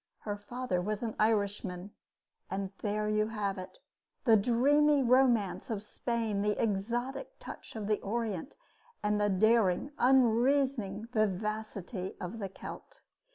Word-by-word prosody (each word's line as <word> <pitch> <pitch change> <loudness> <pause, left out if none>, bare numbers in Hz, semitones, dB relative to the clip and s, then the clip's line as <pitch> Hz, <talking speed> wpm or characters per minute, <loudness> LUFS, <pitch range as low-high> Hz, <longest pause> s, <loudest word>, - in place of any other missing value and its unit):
Her 205 -1 -3
father 205 -2 -3
was 210 +4 -2
an 225 -2 -3
Irishman. 200 -3 0 0.9
There 210 0 -1
you 215 0 +2
have 205 -3 -2
it 185 - -9 0.5
the 230 -4 +6
dreamy 280 +7 +4
romance 245 -6 +3
of 210 -3 -3
Spain, 225 -2 -2
the 210 0 0
exotic 235 +6 -2
touch - - -10
of 215 -2 -4
the 210 0 +1
Orient, 220 - -3 0.5
and 210 0 +1
the 205 - +3
daring, 220 +4 +3
unreasoning 245 -3 +3
vivacity 215 -2 -2
of 180 +6 -5
the 195 -2 -3
Celt. 190 - -10
215 Hz, 125 wpm, -31 LUFS, 200-235 Hz, 0.9 s, the